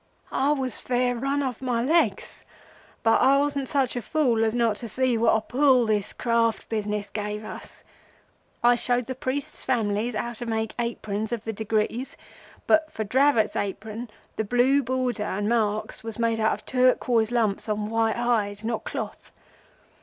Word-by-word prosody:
"I 275 +2 +2
was 260 -5 -2
fair 245 0 0
rim 275 +4 -1
off 255 -3 -3
my 245 -3 0
legs, 330 +6 +1 0.6
but 225 - +4
I 270 +2 +5
wasn't 280 -1 0
such 270 -3 0
a 245 - -2
fool 245 -6 +1
as 220 +1 +1
not 230 -3 +2
to 235 - -7
see 255 +1 +1
what 230 +1 +3
a 220 - +1
pull 255 +1 +3
this 210 -2 0
Craft 230 -2 0
business 210 -2 -2
gave 210 0 -4
us. - - -10 0.8
I 240 0 +6
showed 245 0 0
the 260 - -4
priests' 260 +1 -4
families 225 -2 0
how 235 +3 -2
to 240 +1 -6
make 220 -1 -2
aprons 220 -2 -3
of 235 -3 -3
the 225 - -4
degrees, 220 +4 -2 0.5
but 315 0 +3
for 220 - -3
Dravot's 250 0 +3
apron 215 +4 -4 0.3
the 220 - +1
blue 245 +6 +3
border 255 -2 -1
and 205 0 -2
marks 215 -2 0
was 225 -1 -5
made 230 -1 +1
of 220 - 0
turquoise 250 -3 +2
lumps 225 -3 0
on 210 0 -1
white 225 0 +1
hide, 215 -4 0
not 225 0 -2
cloth. - - -6
235 Hz, 170 wpm, -25 LUFS, 220-255 Hz, 0.8 s, I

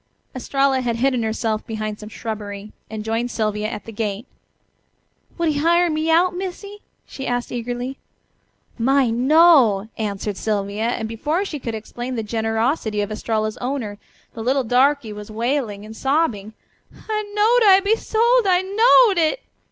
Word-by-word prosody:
Estralla 270 +1 +1
had 240 -2 -1
hidden 250 +1 +1
herself 220 0 -2
behind 215 -1 -4
some 210 - -9
shrubbery, 210 -2 -6 0.2
and 215 -1 -6
joined 225 +2 -1
Sylvia 215 -2 -1
at 210 - -7
the 225 - -8
gate. 210 0 -3 1.1
"Would 335 -2 +1
he 290 -2 0
hire 340 +2 +3
me 310 +1 -1
out, 350 +2 +3
Missy?" 390 +3 -6 0.3
she 270 - -7
asked 245 0 -2
eagerly. 245 +2 -4 0.8
"My, 265 0 +3
no!" 255 - +5
answered 205 -1 -3
Sylvia, 205 0 -2
and 230 -2 -2
before 300 - -2
she 305 -6 -5
could 230 -3 -4
explain 240 +3 -6
the 225 - -2
generosity 225 +1 -1
of 205 +1 -3
Estralla's 215 0 -2
owner, 245 -6 -4 0.3
the 225 - -7
little 260 +4 +1
darky 250 -1 +2
was 210 0 -9
wailing 225 -2 -2
and 220 +1 -10
sobbing: 255 -7 0 0.5
"I 430 -1 -1
knowed 440 +1 +4
I'd 385 0 +6
be 415 +2 +3
sold! 465 +1 +2
I 365 0 +3
knowed 425 0 +5
it." 330 +10 +1
245 Hz, 155 wpm, -21 LUFS, 215-320 Hz, 1.1 s, I'd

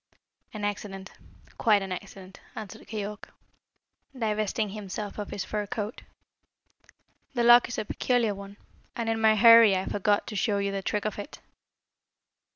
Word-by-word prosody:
"An 210 -1 -4
accident 195 -2 -5 0.5
quite 210 -4 +4
an 190 - -6
accident," 190 0 -8 0.2
answered 210 -4 -9
Keyork, 210 -1 -6 0.9
divesting 215 -1 -1
himself 205 0 -6
of 210 - -5
his 200 - -4
fur 210 -1 -3
coat. 210 +2 -5 1.3
"The 240 - +1
lock 240 +1 +7
is 235 - -5
a - - -2
peculiar 235 -1 0
one, 200 0 -10 0.4
and 230 -1 -2
in 225 0 -1
my 220 -1 +5
hurry 230 -1 +8
I 185 0 -1
forgot 205 0 +1
to 215 - -7
show 205 +1 +1
you 200 0 -1
the 195 0 -3
trick 205 +2 -2
of 215 -1 -3
it." 205 - -8
210 Hz, 155 wpm, -27 LUFS, 200-220 Hz, 1.3 s, hurry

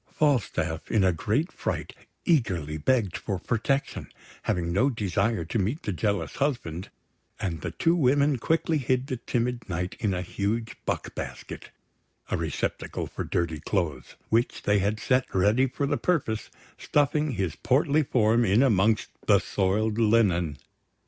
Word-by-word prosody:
Falstaff, 120 - 0
in 105 -3 +3
a 95 - +4
great 110 - 0
fright, - - -3 0.3
eagerly 95 - +1
begged 100 - +1
for 100 -3 -3
protection, 130 +8 -1 0.3
having 85 -1 -1
no 125 +9 +3
desire 105 -4 0
to 100 +7 -1
meet 110 - -1
the 105 - -2
jealous 100 +3 -1
husband; 105 - -2 0.5
and 85 -4 -3
the 90 - -3
two 165 - +1
women 140 -2 +3
quickly 160 +2 +1
hid 130 0 0
the 130 -2 -3
timid 120 -1 -2
Knight 90 +1 -2
in 105 - 0
a 90 - -2
huge 110 +5 -2
buck - - -2
basket - - -7 0.6
a - - +2
receptacle - - -3
for - - -5
dirty 80 -3 -1
clothes 75 -8 -2
which 115 +2 +1
they 105 0 +3
had 105 +3 0
set 125 +2 +2
ready 105 +8 +4
for 140 +3 -2
the 140 - 0
purpose, 135 -11 -1 0.3
stuffing 150 0 +1
his 95 -7 -2
portly 145 +3 +2
form 120 -4 +3
in 105 +4 +4
amongst 110 -3 +3 0.2
the - - +7
soiled 105 +3 0
linen. 95 -9 +3
110 Hz, 150 wpm, -27 LUFS, 95-130 Hz, 0.6 s, the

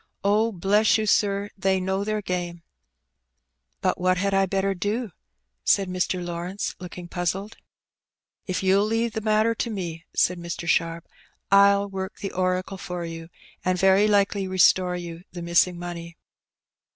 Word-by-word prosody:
Oh, 215 +3 +3
bless 205 +4 +3
you, 220 - -1
sir, 200 0 +1
they 190 0 +1
know 190 +1 -1
their 215 0 -2
game." 175 -2 -4 0.6
" - - -52
But - - 0
what 185 0 +3
had 200 +1 0
I 195 0 +3
better 195 +1 0
do? 205 +4 -2 0.3
" 60 0 -53
said 195 -2 +3
Mr. 180 0 -1
Lawrence, 175 +3 -4
looking 180 -1 -8
puzzled. 185 +4 -3 0.9
"If 185 0 -2
you'll 195 +2 +4
leave 225 +1 0
the 220 - -3
matter 215 +1 +2
to 235 - -3
me," 170 -6 -5
said 180 0 +2
Mr. 170 0 -5
Sharp, 165 0 0 0.4
ni 200 0 +6
work 190 -1 -6
the 195 - -5
oracle 185 +1 -1
for 180 -1 -5
you, 165 0 -7 0.3
and 185 0 +1
very 190 +3 +4
likely 200 -1 +2
restore 185 -1 +4
you 170 -1 -7
the 175 -1 -6
missing 170 +1 +3
money." 170 -1 -7
185 Hz, 160 wpm, -25 LUFS, 175-200 Hz, 0.9 s, ni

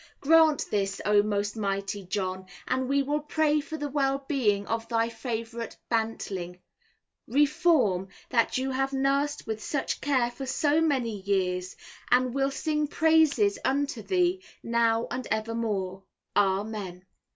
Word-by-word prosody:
Grant 315 0 +4
this, 195 -2 -1
O 210 0 +5
most 205 0 -1
mighty 200 -1 -2
John, 185 -1 -3 0.2
and 260 0 -1
we 280 0 +2
will 295 +2 0
pray 300 0 +1
for 315 +1 -6
the 295 -1 -3
well 275 -1 0
being 210 -9 +1
of 225 +1 -3
thy 230 -1 +1
favourite 230 0 -5
bantling, 200 -6 -2 0.7
Reform, 285 - +3 0.2
that 235 -1 +2
you 265 +1 -1
have 270 +1 -1
nursed 275 +2 0
with 220 -1 -4
such 305 -5 -2
care 255 -4 +1
for 265 +2 -7
so 295 +4 +2
many 255 -9 0
years, 185 -2 -1 0.3
and 250 0 +3
will 275 0 +1
sing 300 +2 -1
praises 305 -10 +3
unto 275 -3 0
thee, 360 - +1 0.2
now 230 0 +2
and 255 -1 -4
evermore. 215 -4 -2 0.3
Amen. 195 -2 -1
235 Hz, 140 wpm, -27 LUFS, 205-285 Hz, 0.7 s, O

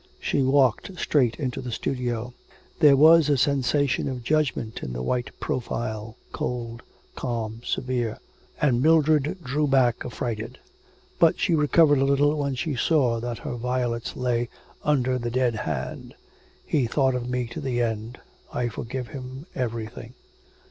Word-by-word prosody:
She - - 0
walked 135 - +2
straight 130 -8 +2
into 130 -4 -2
the 125 -1 -5
studio. 125 -1 -3 0.5
There 145 -2 +7
was 160 +2 +7
a 145 - +3
sensation 140 +1 +1
of 125 -2 -5
judgment 135 -5 0
in 60 - -5
the 60 +1 -4
white 120 - -1
profile, 115 -2 -3
cold, 115 -1 -4 0.3
calm, 115 -2 -4
severe, 125 -4 -2 0.4
and 125 -5 +2
Mildred 155 +1 +3
drew 145 +3 0
back 130 -4 +3
affrighted. 115 -2 -4 0.6
But 165 -1 +4
she 180 - +2
recovered 150 -1 +4
a 135 - +3
little 145 +2 +3
when 140 -2 -1
she 150 +2 -2
saw 125 -3 +2
that 120 0 -4
her - - -3
violets 120 -1 -2
lay 120 -1 0 0.3
under 130 -3 +1
the 120 0 -2
dead 125 0 +1
hand. 80 - -4 0.5
'He 135 -6 +1
thought 130 +2 +2
of 125 -1 -3
me 125 0 -1
to 115 - -6
the 125 -2 -1
end. 115 +1 -3 0.3
I 120 -1 -1
forgive 120 +2 -5
him 130 +1 -8
everything.' 115 0 -5
125 Hz, 150 wpm, -25 LUFS, 120-140 Hz, 0.6 s, There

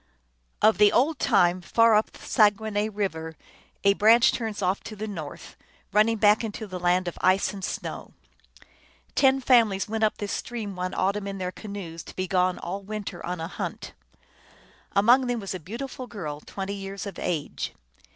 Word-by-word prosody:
Of 215 -2 +5
the 210 -1 +7
old 295 +6 +2
time. 180 -5 +3
Far 230 +5 +4
up 215 +1 +3
the - - -14
Saguenay 210 0 +2
River 160 -6 -4 0.5
a 200 0 +5
branch 225 +4 +5
turns 220 -4 -4
off 185 +2 +1
to 215 - -7
the 215 +1 -5
north, 160 -8 -8 0.4
running 220 +2 +3
back 210 +1 +4
into 220 0 -5
the 185 -3 -6
land 180 +1 +2
of 175 - -5
ice 185 +2 +3
and 195 -1 -8
snow. - - -5 1.0
Ten 270 -1 +4
families 230 -7 +3
went 220 +1 -2
up 215 - +2
this 205 -1 -4
stream 220 -5 -4
one 180 +1 -3
autumn 200 +2 0
in 195 0 -4
their 180 -1 -3
canoes, 190 -6 -7
to - - -11
be 185 - -2
gone 185 -1 +1
all 195 +3 -5
\vinter 205 -3 -6
on 180 0 -4
a 165 - -3
hunt. - - -6 1.0
Among 245 +6 +5
them 245 -1 -1
was 195 -2 -5
a 185 - -5
beautiful 250 - -7
girl, 155 -11 -6
twenty 195 +5 -5
years 195 0 -6
of 200 -3 -7
age. 160 -5 -3
200 Hz, 180 wpm, -26 LUFS, 185-220 Hz, 1.0 s, the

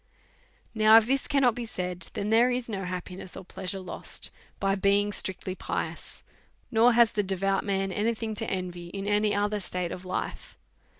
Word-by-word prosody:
Now, 220 0 +7
if 225 - +5
this 270 +3 0
cannot 270 -4 +4
be 245 +1 -5
said, 180 -3 -4
then 205 +2 -2
there 235 +3 +5
is 250 -1 -1
no 195 -4 -3
happi 180 0 -5
ness 185 -1 -9
or 190 - -8
pleasure 190 +1 -4
lost 185 -1 -6 0.3
by 195 0 +2
being 200 +1 +2
strictly 185 -1 -1
pious, - - -5 0.5
nor 235 +1 +5
has 235 -1 +6
the 210 - +2
devout 195 0 0
man 195 -1 -1
any 220 +4 0
thing 220 0 -4
to 210 - -3
envy 180 -2 -4
in 195 +2 -5
any 205 0 +2
other 205 +1 +1
state 180 -2 -3
of 185 - -6
life. 185 - -5
200 Hz, 185 wpm, -28 LUFS, 185-220 Hz, 0.5 s, Now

